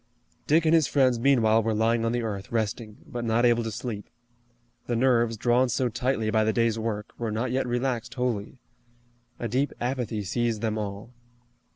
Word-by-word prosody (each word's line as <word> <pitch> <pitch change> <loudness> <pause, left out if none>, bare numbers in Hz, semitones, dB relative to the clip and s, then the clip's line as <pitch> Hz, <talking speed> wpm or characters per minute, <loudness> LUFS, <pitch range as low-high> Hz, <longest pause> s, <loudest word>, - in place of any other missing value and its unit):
Dick 160 +2 +4
and 160 - +4
his 160 -4 +4
friends 130 -4 +2
meanwhile 115 -4 +4
were 110 0 -1
lying 115 +1 +2
on 115 - +1
the 120 0 -1
earth, 100 -3 -5
resting, 110 -1 -2
but 120 -5 -5
not 115 +1 +2
able 120 -1 +3
to 115 - -3
sleep. 105 -1 -6 0.8
The 120 - 0
nerves, 120 -2 +2
drawn 120 +3 +2
so 125 +1 0
tightly 115 -2 -1
by 110 -1 +3
the 110 - +2
day's 115 0 +1
work, 110 -2 -3
were 115 -2 -2
not 115 +3 -2
yet 130 0 0
relaxed 120 -1 -2
wholly. 125 -2 -2 0.8
A 120 - -3
deep 130 +6 0
apathy 120 -4 -2
seized 115 +2 -1
them 110 -1 -1
all. 105 +2 -6
115 Hz, 185 wpm, -26 LUFS, 110-125 Hz, 0.8 s, Dick